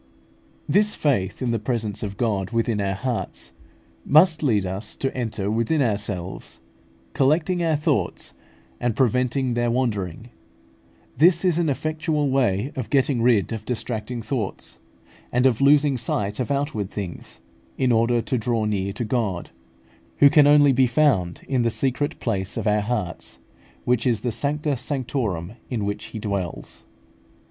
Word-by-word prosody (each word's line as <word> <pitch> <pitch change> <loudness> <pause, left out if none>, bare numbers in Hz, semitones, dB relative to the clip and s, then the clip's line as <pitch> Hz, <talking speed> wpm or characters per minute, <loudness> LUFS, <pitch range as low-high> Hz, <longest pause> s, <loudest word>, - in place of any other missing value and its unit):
This 210 +1 +3
faith 120 -7 0
in 120 - 0
the 115 - 0
presence 110 -2 -2
of 100 -2 -5
God 105 -5 -1
within 115 -2 0
our 95 -1 -1
hearts 120 +3 -4 0.5
must 155 +2 +5
lead 110 -10 +2
us 95 +4 -4
to 135 - -3
enter 110 -5 -2
within 115 +8 +1
ourselves, 105 -7 -3 0.5
collecting 160 +6 +2
our 160 -2 +2
thoughts, 150 - -1 0.5
and 120 -3 -1
preventing 125 +1 +1
their 120 0 0
wandering; 115 -4 -2 0.9
this 170 +3 +5
is 175 -2 +2
an 165 -3 +1
effectual 155 0 -1
way 125 -2 +1
of 130 -4 -4
getting 135 -3 +2
rid 115 -3 +3
of 110 -2 -5
distracting 115 0 -4
thoughts, 115 -5 -4 0.5
and 125 +1 +2
of 130 -2 +3
losing 140 -1 +4
sight 105 -2 -2
of 125 - -2
outward 140 -8 -1
things, 100 -4 -7 0.4
in 130 -2 +2
order 115 +1 +2
to 130 -3 -1
draw 115 -1 0
near 100 -2 -1
to 115 +3 -3
God, 105 -6 -2 0.7
who 140 -1 +7
can 145 -2 +6
only 145 -1 +6
be 130 0 +3
found 120 - +1
in 130 -2 +1
the 115 - +2
secret 135 +5 -1
place 100 -4 -2
of - - -3
our 105 -1 +2
hearts, 105 -5 -4 0.5
which 125 0 +1
is 115 -4 +1
the 120 - -1
sancta 145 +5 -1
sanctorum 120 - -3 0.2
in 115 -5 -2
which 105 0 -3
He - - -8
dwells. 100 -10 -5
120 Hz, 155 wpm, -23 LUFS, 105-140 Hz, 0.9 s, who